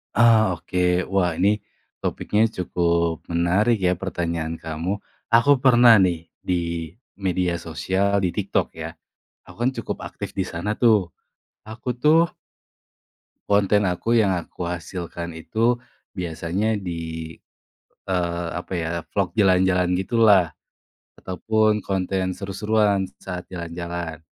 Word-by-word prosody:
Ah, 110 -2 +5
oke 90 - -6 0.3
wah 95 -3 +1
ini, 105 +2 +2 0.4
topiknya 105 +1 +1
cukup 85 -2 0
menarik 95 +7 +2
ya 90 -1 +2
pertanyaan 85 -3 -3
kamu, 80 +6 -3 0.3
aku 120 +5 +5
pernah 120 -2 +7
nih 85 -2 -1 0.2
di 85 -2 -1 0.2
media 90 -2 0
sosial, 95 +5 0
di 95 - +1
TikTok 100 -2 0
ya, 80 0 -6 0.6
aku - - -13
kan 130 - +3
cukup - - -4
aktif - - -7
di 95 - +3
sana 105 +6 -2
tuh, 105 -8 +3 0.5
aku 110 +3 -8
tuh 160 +2 +5 1.3
konten 105 0 +3
aku 90 +6 -1
yang 100 -4 +3
aku 85 0 -6
hasilkan 85 -1 -5
itu, 110 +10 0 0.4
biasanya 90 +5 -1
di, 80 -3 -5 0.7
eee, 85 -2 -1
apa 85 +2 -5
ya 80 -1 -2 0.2
vlog 100 -1 -1
jalan-jalan 95 -3 +3
gitu 95 +5 -3
lah, 95 -7 +5 0.7
ataupun 110 +3 +1
konten 95 -1 -1
seru-seruan 100 0 +1
saat 90 -2 -7
jalan-jalan, 85 -2 -5
90 Hz, 120 wpm, -23 LUFS, 85-105 Hz, 1.3 s, pernah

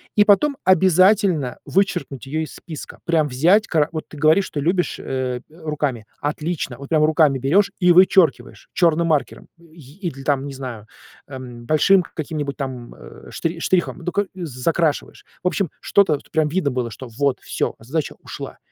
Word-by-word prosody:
И 210 - +6
потом 265 +8 +3
обязательно 185 - +3
вычеркнуть 175 - -1
ее 155 +4 -2
из - - -9
списка. 155 -4 -9
Прям 160 -3 +2
взять 175 +12 +3
ка 155 -2 +1
Вот 155 -2 -5
ты - - -13
говоришь, 155 +6 +4
что 145 -6 -4
любишь, 175 +3 0
э, 130 -2 -3
руками. 150 -8 -3 0.2
Отлично! 150 -3 -3
Вот 140 0 -9
прямо 155 -2 +3
руками 155 -3 +3
берешь 180 +11 +2
и 180 -2 +5
вычеркиваешь 175 -8 +3
черным 170 -1 +2
маркером 155 -3 -1
и 165 +1 -10
или, 135 -4 -6
там, 140 -1 0
не 140 - -7
знаю, 125 -5 -7 0.4
эм, 125 -3 -9
большим 170 +7 +4
каким-нибудь 150 -4 -5
там, 130 -4 -6
э, - - -13
ш 165 +1 -3
штрихом, 175 +1 0
ну, 175 +1 -4
ко 205 0 0
з 185 -2 -6 0.2
закрашиваешь. 165 -1 0 0.2
В - - +1
общем, 180 -1 0
что-то, 175 -8 +3
что - - -26
прям 160 -2 +2
видно 150 -2 0
было, 125 -2 -2
что 125 +5 -9
вот, 135 +3 0
всё, - - -2
задача 140 +7 -3
ушла. - - -8
155 Hz, 175 wpm, -21 LUFS, 135-180 Hz, 0.4 s, И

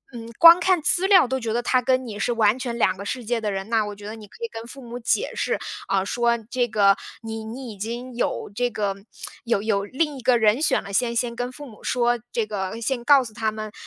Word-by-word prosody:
嗯， 230 -1 -8
光 335 +1 +9
看 365 0 +3
资 350 +4 +3
料 375 -8 +6
都 265 +2 -1
觉 230 -3 -3
得 240 +1 -1
他 255 +1 +2
跟 255 +1 +1
你 210 -3 -7
是 245 - 0
完 220 +1 +2
全 240 -2 -4
两 235 - +2
个 195 - -8
世 240 +4 -4
界 235 +1 -1
的 210 -1 -1
人， 195 0 -4
那 225 -2 +2
我 205 0 -6
觉 205 0 -12
得 215 +2 -6
你 215 -2 -12
可 340 - -13
以 - - 0
跟 225 - -8
父 275 - -11
母 240 0 -7
解 400 - 0
释， - - -1 0.3
呃， 195 -1 +1
说 235 +2 +1
这 250 -1 +1
个 200 -3 +4 0.3
你 225 0 -5
你 235 +2 -7
已 205 - -11
经 240 +5 -5
有 240 - -2
这 245 +3 0
个， 205 -4 -2 0.5
有 230 -4 0
有 200 -2 0
另 295 +7 -1
一 - - -9
个 250 0 +4
人 220 +3 +3
选 315 - +2
了， 200 - -9
先 235 +2 +1
先 235 0 -1
跟 245 +1 -3
父 290 +3 -10
母 220 -4 -15
说， 240 -1 +1
这 230 - -1
个 205 0 -4
先 240 +1 -2
告 280 +1 +6
诉 225 -3 -10
他 220 0 -1
们， 215 0 -6
235 Hz, 275 characters per minute, -23 LUFS, 215-255 Hz, 0.5 s, 光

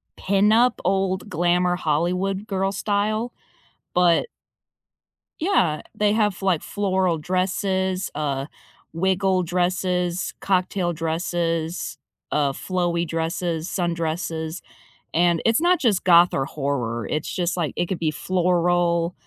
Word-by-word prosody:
pin-up, 215 +5 +3
old 190 +1 0
glamour 175 +1 +2
Hollywood 180 +6 -1
girl 195 -1 0
style, 215 +4 -1 0.6
but 175 - +3 1.1
Yeah. 315 - +2
They 210 -1 +2
have, 210 -4 +1
like, 185 -5 +1
floral 190 -4 0
dresses, 185 +2 -1
uh, 140 -2 -2 0.5
wiggle 190 +2 +1
dresses, 180 0 -1
cocktail 185 -2 0
dresses, 165 +1 -2 0.3
uh, 145 -2 +2
flowy 175 +2 -1
dresses, 165 0 -2
sundresses. 165 -1 -2 0.5
And 170 0 +3
it's 230 0 +4
not 355 +1 +3
just 210 -8 +2
goth 175 -1 +6
or 135 - 0
horror, 125 -6 -2
it's 155 0 -2
just, 180 -1 -1
like 165 -4 -1
it 175 - -1
could 185 - -3
be 160 -2 0
floral, 175 0 +1
180 Hz, 110 wpm, -23 LUFS, 165-190 Hz, 1.1 s, goth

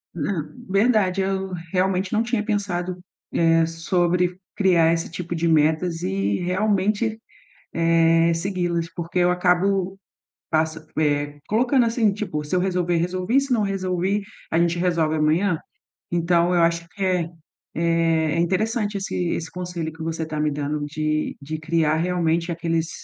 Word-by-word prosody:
Ah, 165 0 -1 0.3
verdade 200 -2 +2
eu 190 0 -2 0.2
realmente 185 0 0
não 215 - +3
tinha 230 -2 -1
pensado, 185 -4 -2 0.3
eh, 165 0 +4
sobre 175 +2 0 0.2
criar 170 -4 +4
esse 165 0 -2
tipo 175 +1 -5
de 165 +1 0
metas 160 +2 +2
e 100 +1 0
realmente, 205 +4 0 0.5
eh, 165 0 +3
segui-las 170 -2 -2
porque 170 +1 -4
eu 175 0 +4
acabo 185 +2 +1 0.5
passa 160 0 0
pé, 145 -1 0
colocando 240 +3 +3
assim 225 -3 +2
tipo: 195 -7 -3
"Se 150 +5 -2
eu - - +2
resolver, 180 -2 0
resolvi, 185 +9 +1
se 275 -1 -3
não 225 -3 +3
resolvi, 195 0 -1 0.3
a 165 - +2
gente 170 0 +2
resolve 170 -3 +1
amanhã". 160 +3 +2 0.5
Então, 170 0 +2
eu 175 - +3
acho 170 0 +1
que 195 +4 -8
é, 180 -3 +1 0.5
eh, 165 -1 +1
interessante 205 +4 0
esse 195 - -4 0.2
esse 160 -1 -4
conselho 175 -3 -4
que 160 - -9
você 160 0 -3
tá 155 -1 -4
me 150 0 +1
dando 145 +1 -2
de 155 +1 -2
de 155 +3 -5
criar 160 -1 +1
realmente 170 0 0
aqueles: 165 -1 -1
175 Hz, 150 wpm, -23 LUFS, 165-190 Hz, 0.5 s, eh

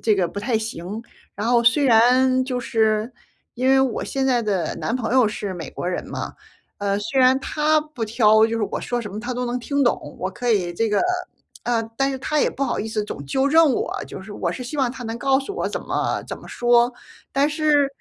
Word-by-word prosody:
这 215 -2 +3
个 185 -3 +1
不 190 - -7
太 225 +1 0
行。 220 -1 -5 0.3
然 205 +3 -3
后 240 -1 +4
虽 260 +5 +4
然 255 +2 +4
就 255 -1 -2
是 220 0 +1 0.4
因 255 +1 0
为 270 0 +6
我 260 -4 0
现 270 -1 -1
在 250 -3 +3
的 200 -5 -1
男 235 - -2
朋 235 -1 -3
友 255 -5 +5
是 205 -2 -4
美 165 -5 -6
国 - - -5
人 180 - -3
嘛， - - -5 0.5
呃， 200 0 0
虽 260 +6 0
然 255 +1 +5
他 305 +2 +2
不 300 -6 -8
挑， 220 0 +5
就 230 0 -2
是 225 - -1
我 - - -2
说 245 - -2
什 210 -3 -7
么 210 - -5
他 245 +2 -4
都 250 - -2
能 245 +1 -2
听 280 +2 0
懂。 145 -10 -1
我 185 - -2
可 240 +5 -2
以 185 -6 +1
这 225 +6 0
个 210 - +2 0.6
呃， 235 -2 +1 0.2
但 270 0 +2
是 265 - -4
他 300 +2 0
也 - - +3
不 275 - -2
好 - - -1
意 220 - -4
思 215 -1 -2
总 175 - -7
纠 265 - +1
正 320 -1 +5
我， - - -2
就 190 - -8
是 200 +2 -10
我 - - -2
是 250 - -6
希 255 +5 -6
望 260 -3 +2
他 255 -1 -8
能 225 0 -4
告 270 +1 +3
诉 280 +9 -5
我 - - -2
怎 - - -3
么 - - -2
怎 - - -5
么 - - -13
说。 240 0 +3 0.4
但 280 +1 +3
是， 300 -2 +3
240 Hz, 260 characters per minute, -22 LUFS, 215-265 Hz, 0.6 s, 为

